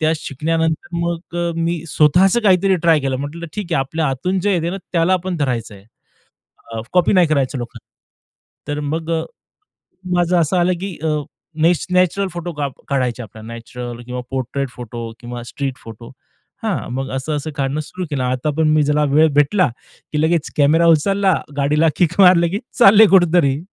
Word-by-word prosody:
त्या 155 Hz, 0 st, +2 dB
शिकल्यानंतर 160 Hz, +4 st, -2 dB
मग, 170 Hz, 0 st, -3 dB
अ, 170 Hz, -1 st, -1 dB
मी 165 Hz, 0 st, -1 dB
स्वतःचं 180 Hz, +10 st, +4 dB
काहीतरी 190 Hz, -1 st, +3 dB
ट्राय 160 Hz, -2 st, +5 dB
केलं. 135 Hz, -1 st, -1 dB
म्हटलं, 160 Hz, +5 st, -6 dB
ठीक 190 Hz, -5 st, -4 dB
आहे, -, -, +2 dB
आपल्या 155 Hz, +4 st, -2 dB
आतून 180 Hz, +9 st, -1 dB
जे 205 Hz, +2 st, +1 dB
येतं 170 Hz, 0 st, -1 dB
ना, 195 Hz, -, -4 dB, 0.2 s
त्याला 170 Hz, +1 st, +2 dB
आपण 185 Hz, -1 st, -1 dB
धरायचं 125 Hz, -7 st, -2 dB
आहे, 100 Hz, 0 st, -16 dB, 1.1 s
कॉपी 180 Hz, +2 st, +3 dB
नाही 180 Hz, -3 st, +5 dB
करायचं 140 Hz, -3 st, 0 dB
लोकांन 120 Hz, -1 st, -7 dB, 0.9 s
तर 145 Hz, 0 st, -3 dB
मग, 160 Hz, +1 st, -3 dB
अ, 165 Hz, -, +1 dB, 0.9 s
माझं 175 Hz, 0 st, +2 dB
असं 170 Hz, +4 st, 0 dB
आलं, 180 Hz, +1 st, +2 dB
की 195 Hz, -3 st, -5 dB
अ, -, -, 0 dB, 0.5 s
नॅच 170 Hz, +1 st, +3 dB
नॅचरल 185 Hz, +2 st, +2 dB
फोटो 175 Hz, 0 st, -5 dB, 0.4 s
काढायचे 125 Hz, -3 st, -1 dB
आपल्याला, 110 Hz, +1 st, -12 dB
नॅचरल 120 Hz, +1 st, -8 dB
किंवा 125 Hz, 0 st, -5 dB
पोट्रेट 135 Hz, +1 st, -3 dB
फोटो 120 Hz, -1 st, -7 dB
किंवा 120 Hz, 0 st, -7 dB
स्ट्रीट 135 Hz, +1 st, -5 dB
फोटो, 115 Hz, +1 st, -11 dB, 0.5 s
हां. -, -, -2 dB
मग 135 Hz, 0 st, -3 dB
असं 150 Hz, +3 st, -2 dB
असं 155 Hz, +2 st, -5 dB
काढणं 140 Hz, +1 st, -1 dB
सुरू 180 Hz, +4 st, -6 dB
केलं. 135 Hz, -4 st, -2 dB
आता 130 Hz, +4 st, -1 dB
पण 160 Hz, -1 st, +3 dB
मी 155 Hz, -1 st, +3 dB
ज्याला 150 Hz, +1 st, +1 dB
वेळ 155 Hz, +2 st, +6 dB
भेटला, 145 Hz, +4 st, +3 dB, 0.4 s
की 150 Hz, 0 st, 0 dB
लगेच 160 Hz, 0 st, 0 dB
कॅमेरा 160 Hz, +4 st, +4 dB
उचलला, 190 Hz, +4 st, +3 dB, 0.2 s
गाडीला 150 Hz, +3 st, +2 dB
किक 175 Hz, +1 st, +1 dB
मारलं, 175 Hz, -2 st, +6 dB
की 200 Hz, +5 st, -2 dB, 0.2 s
चालले 215 Hz, 0 st, +8 dB
कुठेतरी. 165 Hz, -6 st, +3 dB
160 Hz, 170 wpm, -19 LUFS, 135-175 Hz, 1.1 s, चालले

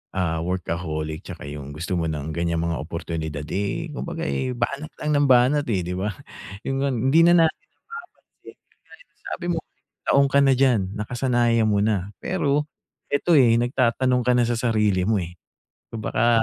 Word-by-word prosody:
ah, 85 Hz, -4 st, 0 dB
workaholic 80 Hz, -3 st, -3 dB
'tsaka -, -, -10 dB
'yong 70 Hz, -1 st, -8 dB
gusto 85 Hz, +3 st, -2 dB
mo 80 Hz, -, -1 dB
ng 75 Hz, 0 st, -4 dB
ganiyang 85 Hz, 0 st, -1 dB
mga 85 Hz, -1 st, -1 dB
oportunidad, 80 Hz, -2 st, -5 dB
eh, 100 Hz, +1 st, -2 dB
kumbaga, -, -, -5 dB
eh, 70 Hz, -, -2 dB
banat 140 Hz, +5 st, -2 dB, 0.2 s
lang 150 Hz, -, 0 dB
ng 145 Hz, -1 st, +3 dB
banat, 130 Hz, +3 st, +4 dB
eh, 95 Hz, -6 st, 0 dB
'di 90 Hz, +1 st, -4 dB
ba. 105 Hz, 0 st, -2 dB, 0.5 s
'Yon 135 Hz, 0 st, -2 dB
ngang 135 Hz, -2 st, 0 dB
hindi 160 Hz, -, +5 dB
na 175 Hz, -1 st, +6 dB
natin 160 Hz, -, 0 dB, 0.6 s
napapansin, -, -, -18 dB
kagaya -, -, -20 dB
no'ng -, -, -40 dB
sabi -, -, -5 dB
mo, 175 Hz, -1 st, 0 dB, 0.5 s
taon 140 Hz, 0 st, +4 dB
ka 140 Hz, +1 st, +3 dB
na 135 Hz, -, +5 dB
diyan, 130 Hz, -5 st, +4 dB
nakasanayan 120 Hz, +1 st, +1 dB
mo 100 Hz, -, +2 dB
na, 100 Hz, -2 st, 0 dB
pero 150 Hz, -5 st, 0 dB, 0.4 s
ito, 145 Hz, +5 st, 0 dB
eh, 120 Hz, -3 st, +5 dB
nagtatanong 125 Hz, +1 st, +1 dB
ka -, -, +5 dB
na 120 Hz, -, +4 dB
sa 120 Hz, -1 st, -1 dB
sarili 105 Hz, -6 st, +1 dB
mo, 105 Hz, -5 st, +1 dB
eh. 85 Hz, +1 st, -10 dB, 0.5 s
Kung 110 Hz, -2 st, -7 dB
baka, 115 Hz, 0 st, +2 dB
110 Hz, 180 wpm, -23 LUFS, 85-130 Hz, 0.6 s, na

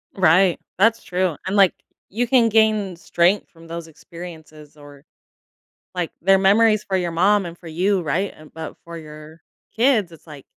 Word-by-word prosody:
Right. 180 Hz, 0 st, +4 dB, 0.2 s
That's 225 Hz, +3 st, +3 dB
true, 180 Hz, -2 st, -1 dB
and, 190 Hz, +2 st, -2 dB
like, 195 Hz, -3 st, +5 dB, 0.4 s
you 235 Hz, +5 st, -1 dB
can 240 Hz, -2 st, +4 dB
gain 215 Hz, -4 st, +2 dB
strength 175 Hz, +3 st, +1 dB
from 165 Hz, 0 st, -17 dB
those 165 Hz, 0 st, -7 dB
experiences 160 Hz, -2 st, -12 dB
or, 145 Hz, 0 st, -15 dB, 0.9 s
like, 175 Hz, -2 st, -3 dB
they're 195 Hz, +2 st, +4 dB
memories 210 Hz, +2 st, +4 dB
for 190 Hz, -, -2 dB
your 175 Hz, -2 st, -2 dB
mom 195 Hz, +3 st, +2 dB
and 170 Hz, 0 st, -8 dB
for 170 Hz, -, -13 dB
you, 185 Hz, +4 st, 0 dB
right? 175 Hz, +6 st, -2 dB
An 155 Hz, 0 st, -16 dB
but 160 Hz, 0 st, -8 dB
for 170 Hz, 0 st, -9 dB
your 155 Hz, 0 st, -12 dB, 0.3 s
kids, 225 Hz, -7 st, +2 dB
it's 165 Hz, -, -16 dB
like 145 Hz, -4 st, -12 dB
180 Hz, 170 wpm, -21 LUFS, 165-200 Hz, 0.9 s, like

